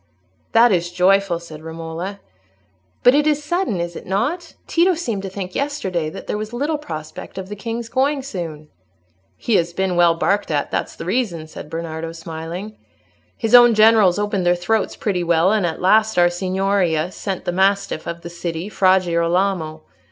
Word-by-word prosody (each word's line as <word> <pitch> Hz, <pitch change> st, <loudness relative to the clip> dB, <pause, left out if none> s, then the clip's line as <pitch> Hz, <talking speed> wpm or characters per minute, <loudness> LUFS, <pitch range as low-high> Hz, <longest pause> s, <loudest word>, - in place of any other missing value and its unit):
"That 235 Hz, +1 st, +6 dB
is 175 Hz, -2 st, 0 dB
joyful," 185 Hz, 0 st, +2 dB
said 160 Hz, -3 st, -11 dB
Romola. 165 Hz, +4 st, -6 dB, 0.8 s
"But 245 Hz, -, +7 dB
it 295 Hz, +1 st, +3 dB
is 300 Hz, -1 st, +1 dB
sudden, 345 Hz, -, -1 dB
is 170 Hz, 0 st, -4 dB
it -, -, -9 dB
not? 280 Hz, -, -2 dB
Tito 350 Hz, +2 st, +3 dB
seemed 235 Hz, -, -3 dB
to 195 Hz, -, -5 dB
think 185 Hz, -1 st, -6 dB
yesterday 190 Hz, -, -2 dB
that -, -, -9 dB
there 210 Hz, -, -3 dB
was 215 Hz, +2 st, -6 dB
little 295 Hz, +5 st, -1 dB
prospect 155 Hz, -, -8 dB
of 190 Hz, 0 st, -6 dB
the 210 Hz, -, -5 dB
king's 230 Hz, +2 st, -5 dB
going 270 Hz, +3 st, 0 dB
soon." 165 Hz, -, -6 dB, 0.7 s
"He 225 Hz, -4 st, +1 dB
has 170 Hz, -1 st, -1 dB
been 190 Hz, 0 st, -1 dB
well 170 Hz, -1 st, +4 dB
barked 200 Hz, +4 st, 0 dB
at, 145 Hz, -2 st, -1 dB
that's -, -, -2 dB
the -, -, -8 dB
reason," 185 Hz, -6 st, -1 dB
said 155 Hz, -1 st, -10 dB
Bernardo, 165 Hz, 0 st, -5 dB
smiling. 165 Hz, +5 st, -7 dB, 0.6 s
"His 225 Hz, 0 st, -2 dB
own 240 Hz, -2 st, +8 dB
generals 215 Hz, -4 st, +5 dB
opened 205 Hz, -2 st, -1 dB
their 175 Hz, 0 st, +3 dB
throats 210 Hz, +5 st, -1 dB
pretty 185 Hz, -4 st, -1 dB
well, 170 Hz, +2 st, +3 dB
and 210 Hz, -5 st, +2 dB
at 160 Hz, -, -4 dB
last 215 Hz, +3 st, +3 dB
our 175 Hz, 0 st, +5 dB
Signoria 185 Hz, -2 st, 0 dB
sent 190 Hz, -2 st, -5 dB
the -, -, 0 dB
mastiff 195 Hz, -2 st, +1 dB
of 170 Hz, 0 st, -5 dB
the 170 Hz, -, -7 dB
city, 170 Hz, +2 st, -4 dB
Fra 190 Hz, -2 st, +4 dB
Girolamo. 170 Hz, -2 st, 0 dB
190 Hz, 180 wpm, -20 LUFS, 170-220 Hz, 0.8 s, own